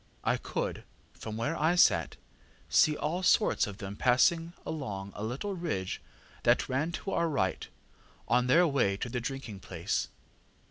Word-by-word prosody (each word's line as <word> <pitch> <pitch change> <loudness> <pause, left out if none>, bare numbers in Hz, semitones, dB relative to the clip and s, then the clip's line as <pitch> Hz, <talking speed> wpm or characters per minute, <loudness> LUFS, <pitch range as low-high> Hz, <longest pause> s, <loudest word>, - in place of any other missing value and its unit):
I - - +2
could, - - -4 0.3
from 110 0 -7
where 145 +8 -1
I 160 +4 +2
sat, 180 - +4 0.5
see 155 -1 +4
all 170 +5 -2
sorts 190 - +3
of 100 -1 -7
them 100 -1 -6
passing 165 +9 +3
along 100 -11 -5
a 105 - -5
little 130 - -3
ridge 125 - -3 0.4
that - - +3
ran 150 +6 -1
to 195 - -4
our 170 -2 +1
right, 95 -11 -1 0.6
on 125 +1 +3
their 170 +7 +6
way 135 -11 +1
to 120 - -4
the 125 0 -3
drinking 120 -5 -5
place. 90 -1 -2
130 Hz, 155 wpm, -30 LUFS, 105-165 Hz, 0.6 s, their